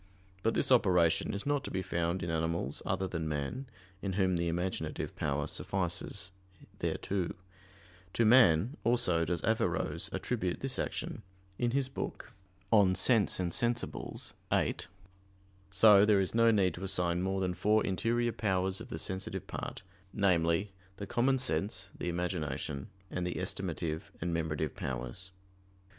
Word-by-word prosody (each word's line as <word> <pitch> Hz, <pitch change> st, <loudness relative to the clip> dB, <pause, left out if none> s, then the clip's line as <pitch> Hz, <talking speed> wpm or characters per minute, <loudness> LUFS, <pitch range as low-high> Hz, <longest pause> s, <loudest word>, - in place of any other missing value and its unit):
But 115 Hz, +3 st, +1 dB
this -, -, +2 dB
operation 90 Hz, -9 st, +4 dB
is 100 Hz, 0 st, -4 dB
not 145 Hz, -1 st, +1 dB
to -, -, -5 dB
be 95 Hz, 0 st, -2 dB
found 85 Hz, 0 st, -1 dB
in 85 Hz, -, -2 dB
animals 80 Hz, +1 st, -1 dB
other 95 Hz, 0 st, 0 dB
than 80 Hz, -3 st, -3 dB
man, 75 Hz, -, -3 dB, 0.3 s
in 95 Hz, -2 st, -2 dB
whom 95 Hz, -1 st, +2 dB
the 85 Hz, 0 st, 0 dB
imaginative 90 Hz, +3 st, -2 dB
power -, -, -1 dB
suffices 90 Hz, -1 st, -2 dB, 0.5 s
thereto. 95 Hz, -3 st, -2 dB, 0.8 s
To 115 Hz, -, +3 dB
man 110 Hz, -, +5 dB
also 90 Hz, -8 st, +3 dB
does 85 Hz, 0 st, -1 dB
Averroes 110 Hz, 0 st, 0 dB
attribute 100 Hz, -8 st, -2 dB
this 135 Hz, -1 st, -2 dB
action -, -, -3 dB, 0.4 s
in 120 Hz, -, +2 dB
his 135 Hz, +2 st, +1 dB
book 135 Hz, -, -6 dB, 0.4 s
De 100 Hz, -4 st, +6 dB
sensu 105 Hz, -6 st, +2 dB
et 90 Hz, -, 0 dB
sensibilibus 120 Hz, +6 st, -2 dB, 0.2 s
(viii). -, -, +1 dB, 0.8 s
So 100 Hz, +1 st, +7 dB
there 105 Hz, -1 st, +5 dB
is 95 Hz, -, 0 dB
no 115 Hz, 0 st, +5 dB
need 100 Hz, -5 st, +3 dB
to 90 Hz, -, -7 dB
assign 90 Hz, -3 st, +2 dB
more 95 Hz, +1 st, 0 dB
than 90 Hz, -1 st, 0 dB
four 105 Hz, +4 st, +2 dB
interior 120 Hz, +5 st, +1 dB
powers 95 Hz, -2 st, 0 dB
of 120 Hz, -, -9 dB
the -, -, -4 dB
sensitive 95 Hz, 0 st, -3 dB
part -, -, -6 dB, 0.3 s
namely, 90 Hz, -1 st, +2 dB, 0.3 s
the 100 Hz, -, -5 dB
common 130 Hz, +6 st, +2 dB
sense, 100 Hz, -7 st, -1 dB
the -, -, -3 dB
imagination, 85 Hz, -5 st, -3 dB, 0.2 s
and 90 Hz, -, -2 dB
the 90 Hz, -, -2 dB
estimative 80 Hz, -1 st, -3 dB
and 85 Hz, 0 st, -2 dB
memorative 80 Hz, -2 st, -1 dB
powers. 65 Hz, +8 st, -4 dB
95 Hz, 150 wpm, -32 LUFS, 85-110 Hz, 0.8 s, So